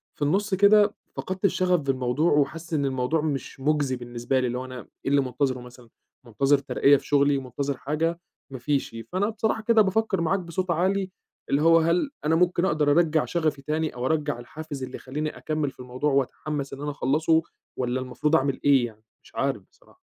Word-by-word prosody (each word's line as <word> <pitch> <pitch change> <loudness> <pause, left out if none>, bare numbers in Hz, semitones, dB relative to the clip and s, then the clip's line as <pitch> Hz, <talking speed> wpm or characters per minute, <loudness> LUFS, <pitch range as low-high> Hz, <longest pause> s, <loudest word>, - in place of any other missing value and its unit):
في - - -27
النُص 195 +8 +1
كده 205 +1 +5 0.2
فقدت 190 +1 -3
الشغف 180 -1 +2
بالموضوع 135 +2 0
وحاسس 155 +3 0
إن 145 -2 +1
الموضوع 130 +4 0
مش 145 -3 -4
مُجزي 145 -1 +1
بالنسبة 120 +1 -2
لي، 130 - 0
اللي 125 +1 -2
هو 130 - -5
أنا 130 -1 -8 0.3
إيه 135 - 0
اللي 140 0 +4
منتظره 130 0 -1
مثلًا، 125 -1 -14 0.4
منتظر 135 +5 +2
ترقية 140 +1 +3
في - - -12
شغلي، 140 0 +3
منتظر 135 +1 -3
حاجة؟ 165 +5 -1 0.3
ما 130 - -6
فيش. 135 -1 -1 0.2
فأنا 195 +3 0
بصراحة 220 0 -1
كده 230 -1 +5
بافكر 200 -1 +1
معاك 185 +4 +1
بصوت 180 +1 -3
عالي، 190 +3 0 0.4
اللي 140 - +2
هو 165 +1 +6
هل 170 - +1 0.2
أنا 160 +2 +3
ممكن 180 +1 +2
أقدر 150 -4 +2
أرجّع 155 0 +3
شغفي 155 -5 -1
تاني 155 +1 -2
أو 125 +1 -3
أرجّع 150 -3 0
الحافز 145 +2 -7
اللي 130 0 -6
يخلّيني 150 +4 -5
أكمّل 155 -2 -2
في - - -30
الموضوع 125 +4 -2
وأتحمس 140 +1 -2
إن 135 - -8
أنا 145 0 -2
أخلصه، 155 +4 +2 0.4
والّا 125 0 -1
المفروض 130 +5 0
أعمل 140 -3 +1
إيه 135 -4 +5
يعني؟ 110 -1 -16 0.2
مش - - -20
عارف - - -1
بصراحة. - - -25
145 Hz, 190 wpm, -25 LUFS, 130-165 Hz, 0.4 s, هو